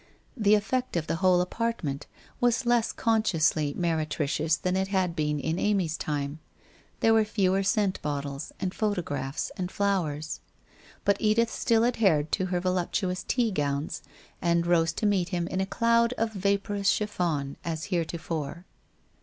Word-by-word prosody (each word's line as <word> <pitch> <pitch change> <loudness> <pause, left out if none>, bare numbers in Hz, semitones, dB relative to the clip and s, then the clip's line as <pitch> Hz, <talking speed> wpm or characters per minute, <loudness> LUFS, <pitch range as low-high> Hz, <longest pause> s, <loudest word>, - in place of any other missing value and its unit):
The 210 -4 +4
effect 235 +1 -1
of 160 - -1
the 165 - -1
whole 180 0 +4
apartment 180 -8 -2 0.3
was 245 +1 +2
less 240 -1 +2
consciously 165 -10 +1
meretricious 155 -2 0
than 180 +3 -1
it 190 0 0
had 185 -3 0
been 150 -2 0
in 160 +4 -1
Amy's 190 -6 +1
time. 145 -1 -3 0.6
There 225 - +5
were 220 -1 +5
fewer 195 -3 +1
scent 195 -1 +1
bottles, 145 0 -4
and 185 -1 -2
photographs, 160 -10 -2
and 180 -1 -2
flowers; 165 -7 -1 0.7
but 200 -1 +3
Edith 225 +1 +2
still 230 -1 +2
adhered 190 -11 +2
to 185 - 0
her 180 -1 0
voluptuous 185 +1 -1
tea 235 +1 0
gowns, 145 -3 -2 0.4
and 170 0 +2
rose 165 -2 +3
to 215 - -2
meet 195 -4 +2
him 175 -2 -1
in 185 - -1
a 190 - -1
cloud 230 +2 +3
of 225 -2 -1
vaporous 200 0 0
chiffon 170 -9 -1
as 160 -1 -3
heretofore. 165 -1 -3
180 Hz, 150 wpm, -27 LUFS, 160-210 Hz, 0.7 s, There